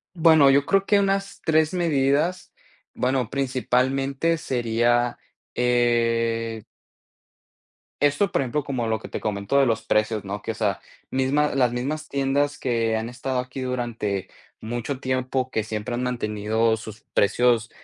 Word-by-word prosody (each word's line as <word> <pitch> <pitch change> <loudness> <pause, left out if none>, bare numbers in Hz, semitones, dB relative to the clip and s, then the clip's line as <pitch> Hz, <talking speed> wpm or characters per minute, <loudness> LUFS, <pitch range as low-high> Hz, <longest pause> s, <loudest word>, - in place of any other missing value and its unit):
Bueno, 160 -4 +6
yo 140 +1 +3
creo 195 0 +3
que 205 0 +3
unas 195 0 -1
3 160 +1 +2
medidas, 160 0 +1 0.4
bueno, 125 -2 -1
principalmente 135 +3 0
sería, 120 -2 +1 0.4
eh 115 -2 +1 1.4
Esto, 145 +7 +2
por - - +2
ejemplo, 135 +3 -2
como 125 -5 -2
lo 110 0 0
que - - -10
te - - -5
comento 105 +6 0
de 135 - +4
los 115 -2 0
precios, 110 -1 +1
¿no?, 100 +1 -5
que, - - -4
o - - -2
sea, 105 -3 -1 0.3
misma 135 +3 +1
las 125 -3 +3
mismas 145 +6 -3
tiendas 140 +1 0
que 115 -3 0
han 110 +1 -3
estado 125 +1 -3
aquí 125 +1 -4
durante 120 -6 -3 0.3
mucho 120 +4 -4
tiempo 130 0 -1
que 110 - 0
siempre 110 +2 -4
han 120 - -2
mantenido 110 -2 0
sus 110 -1 -10
precios, 115 +2 +2
125 Hz, 145 wpm, -24 LUFS, 115-140 Hz, 1.4 s, Bueno